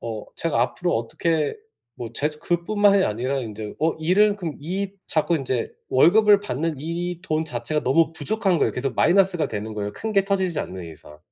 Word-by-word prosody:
어 110 -2 -5
제가 160 -8 0
앞으로 175 +8 -1
어떻게 155 - -1 0.4
뭐 115 -2 -5
제 145 +5 0
그뿐만이 190 +6 +2
아니라 125 +6 -1
인제 110 -3 -6
어 160 +1 +2
일은 200 +6 +3
그럼 170 -7 -4
이 190 +6 -3 0.2
자꾸 160 +2 +1
인제 130 -4 -2 0.2
월급을 205 +9 +6
받는 165 -4 -2
이 170 +3 -4
돈 155 -3 -1
자체가 150 +1 -2
너무 160 +5 +3
부족한 190 +3 0
거예요. - - +2
계속 130 0 -3
마이너스가 180 -1 +3
되는 110 0 -5
거예요 105 -1 -3
큰 220 0 -4
게 195 -2 +3
터지지 190 -4 0
않는 90 -1 -6
이상. 75 -1 -14
160 Hz, 365 characters per minute, -23 LUFS, 125-185 Hz, 0.4 s, 월급을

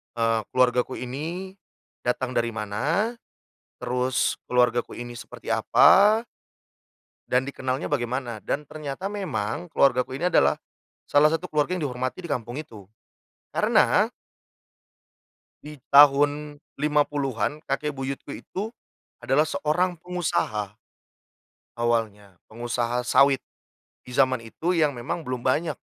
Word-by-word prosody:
eee, 115 -1 +1
keluargaku 125 0 +2
ini, 165 +10 -5 0.5
datang 125 +1 -1
dari 115 -1 0
mana. 150 - -1 0.7
Terus 125 +1 0
keluargaku 125 -1 +1
ini 120 -1 -7
seperti - - -9
apa 210 +3 +5 1.1
dan 125 +1 +2
dikenalnya 130 0 -3
bagaimana 120 -3 -2
dan 150 - -3
ternyata 155 +6 -6
memang 175 - -3
keluargaku 130 -3 +2
ini 175 +5 +1
adalah, - - +4 0.5
salah 145 +1 +5
satu 165 +3 -2
keluarga 150 +4 +1
yang 170 - -4
dihormati 130 +7 -4
di 170 - -7
kampung 120 -2 -3
itu. 115 -11 -9 0.7
Karena - - +3 1.6
di 150 0 -9 0.2
tahun 145 +1 +5 0.2
50-an 145 -4 0
kakek 150 +2 -1
buyutku 135 +1 -5
itu, 210 +4 -6 0.5
adalah 150 +3 +2
seorang 170 +3 -1
pengusaha 150 - -2 1.1
awalnya 110 -4 -1 0.2
pengusaha 120 +1 -2
sawit, 140 +1 +5 0.7
di 125 - -12
jaman 130 -2 +3
itu 165 +10 -2
yang 155 -3 +3
memang 135 +8 -3
belum 125 -2 -5
banyak, 150 +3 +1
135 Hz, 110 wpm, -25 LUFS, 120-155 Hz, 1.6 s, apa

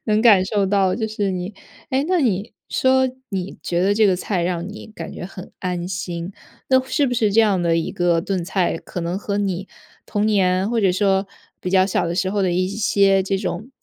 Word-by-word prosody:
能 215 0 +2
感 205 -6 +6
受 200 +1 0
到 190 -1 +2
就 220 -2 -2
是 205 -2 -1
你 185 +2 -4 0.4
诶， 265 +2 +1
那 365 -1 +3
你 215 -4 0 0.2
说 260 0 +3 0.2
你 190 -1 -4
觉 175 0 0
得 195 +2 +3
这 215 0 +4
个 190 - +3
菜 180 -1 -2
让 175 0 -2
你 210 - -9
感 165 -4 -7
觉 - - -7
很 185 0 -9
安 180 -1 -3
心， 180 -1 -4 0.4
那 260 0 +5
是 280 +2 +1
不 245 - -1
是 215 -4 +2
这 225 - +6
样 205 -5 +3
的 170 -1 +2
一 165 - -1
个 175 -3 +1
炖 185 -1 -2
菜 185 -1 0
可 175 - -7
能 175 +3 -2
和 205 -1 -3
你 195 -1 -2 0.4
童 205 0 -1
年 190 -1 +2
或 235 -2 +1
者 190 -3 +3
说 195 0 +2 0.3
比 180 - -3
较 190 0 +5
小 190 -2 0
的 170 - -2
时 185 +1 0
候 205 - 0
的 180 - +1
一 185 +1 +1
些 200 -2 +3
这 195 +1 -1
种 200 +4 -4
195 Hz, 240 characters per minute, -21 LUFS, 180-210 Hz, 0.4 s, 感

